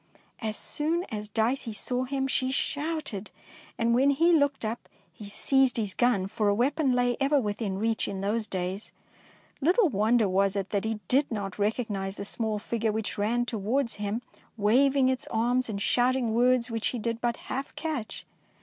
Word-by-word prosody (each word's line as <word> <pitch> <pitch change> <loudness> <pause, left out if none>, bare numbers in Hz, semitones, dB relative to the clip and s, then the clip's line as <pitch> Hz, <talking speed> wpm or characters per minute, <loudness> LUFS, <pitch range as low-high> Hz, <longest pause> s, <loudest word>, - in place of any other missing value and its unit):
As 220 -2 -2
soon 325 +4 -1
as 210 -1 -5
Dicey 225 +2 0
saw 250 +4 0
him, 270 0 -1
she 260 -1 0
shouted, 290 - -2 0.5
and 235 0 +2
when 265 +4 +4
he 330 +5 +4
looked 285 -6 +2
up, 225 +2 -4 0.2
he 205 -2 -9
seized 265 +4 +2
his 210 -4 -1
gun, 240 -5 +2
for 210 +2 -1
a 200 - +3
weapon 270 +4 +2
lay 245 -1 +2
e^er 280 +1 +3
within 205 -3 -2
reach 225 +2 0
in 190 -1 -4
those 215 +2 -1
days. 185 +2 -4 0.7
Little 360 - +4
wonder 220 0 +3
was 195 +1 +2
it 195 -1 -3
that 205 0 0
he 220 -1 -2
did 275 +3 +3
not 200 -4 -3
recog 220 +3 0
nise 195 -1 -3
the 200 - -4
small 220 0 -1
figure 225 +1 -1
which 215 -1 -3
ran 235 +4 +1
towards 230 +3 -1
him 210 +3 -3 0.3
waving 260 +6 +4
its 260 -1 -1
arms 245 +2 +1
and 200 -2 -3
shouting 245 +1 +2
words 245 0 +3
which 225 -1 -1
he 250 - -2
did 230 +1 -3
but 240 -1 0
half 270 +2 -5
catch. 300 -9 -4
230 Hz, 180 wpm, -28 LUFS, 210-260 Hz, 0.7 s, when